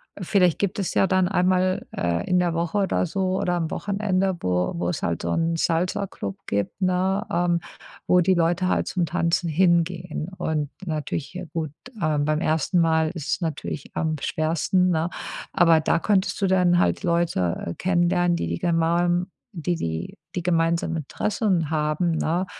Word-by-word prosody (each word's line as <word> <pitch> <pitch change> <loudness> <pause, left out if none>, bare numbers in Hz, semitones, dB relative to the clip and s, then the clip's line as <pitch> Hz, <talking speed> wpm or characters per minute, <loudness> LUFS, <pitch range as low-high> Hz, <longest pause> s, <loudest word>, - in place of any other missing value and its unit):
äh, - - -10
vielleicht 180 -2 +3
gibt 200 0 -1
es 195 - -2
ja 195 - +3
dann 185 -1 +2
einmal 185 0 +1
äh, 85 0 -1
in 180 - +4
der 175 -2 +1
Woche 170 +4 -1
oder 190 -2 +1
so 185 +2 -1
oder 180 - 0
am 165 -2 -1
Wochenende, 195 -2 0
wo 90 - 0
wo - - -1
es 175 - -3
halt 85 -1 -1
so 85 - -2
'n 165 - +1
Salsaclub 170 - -1
gibt, 100 - -2
ne, 185 +3 +1
ähm, 175 0 +2 0.5
wo 180 - +5
die 190 +2 +3
Leute 175 +1 +1
halt - - +1
zum 180 -3 0
Tanzen 170 0 0
hingehen. 170 0 +1
Und 150 -2 -1 0.2
natürlich, 155 -1 -3
ja 180 0 -6
gut, 160 -3 -2 0.3
ähm, 150 -2 +1
beim 155 +2 0
1. 160 +3 +1
Mal 160 -1 +2
ist 165 -6 -6
es - - -1
natürlich 155 -3 -4
am 160 -1 0
schwersten, 165 +4 +1
ne, 165 0 +1 0.4
aber 165 -2 +5
da 165 +2 +1
könntest 200 +1 +1
du 195 - +3
dann 180 -2 +3
halt - - +1
Leute, 170 - 0
äh, 85 - -3
kennenlernen, 175 -1 +2
die 85 - -2
die 85 - -3
gema 170 +1 +2 0.4
die 175 0 -1
die 80 - -4 0.2
die 175 - -2
gemeinsamen 165 -1 +1
Interessen 180 - -1
haben, 155 +2 0
ne? 165 +3 0
170 Hz, 175 wpm, -24 LUFS, 160-185 Hz, 0.5 s, wo